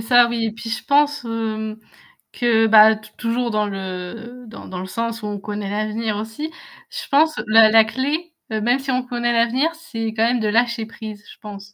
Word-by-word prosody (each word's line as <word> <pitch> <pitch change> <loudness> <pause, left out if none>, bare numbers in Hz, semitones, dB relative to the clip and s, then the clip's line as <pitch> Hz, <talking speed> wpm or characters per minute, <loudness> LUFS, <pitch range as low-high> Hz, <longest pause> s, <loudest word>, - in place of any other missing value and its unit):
ça 240 +1 +5
oui 235 -1 -2
et 220 - -3
puis 225 +1 -8
je 225 - -3
pense, 290 -1 +2
hem, 220 -1 -3 0.6
que 230 -2 +2
bah, 220 0 +7
t 215 0 -13
toujours 235 0 -1
dans 210 0 +1
le 195 +6 -7
dans 225 - -11
dans 185 - -6
le 185 - -6
sens 230 +3 -3
où 210 - -4
on 205 -1 -4
connaît 205 -1 -5
l'avenir 215 +1 -2
aussi, 225 +9 -5 0.4
Je - - -7
pense 305 +2 +3
la 220 0 +7
la 225 0 +7
clé, 300 +8 -3 0.2
heu, 215 - -1
même 245 +4 +2
si 270 0 -7
on 255 0 0
connaît 240 -1 -1
l'avenir, 240 +7 +2
c'est 230 -9 -5
quand 225 - +1
même 240 +2 +2
de 220 - -1
lâcher 235 +1 +1
prise, 215 -2 -9
je - - -16
pense. 200 -1 -10
225 Hz, 210 wpm, -21 LUFS, 215-245 Hz, 0.6 s, bah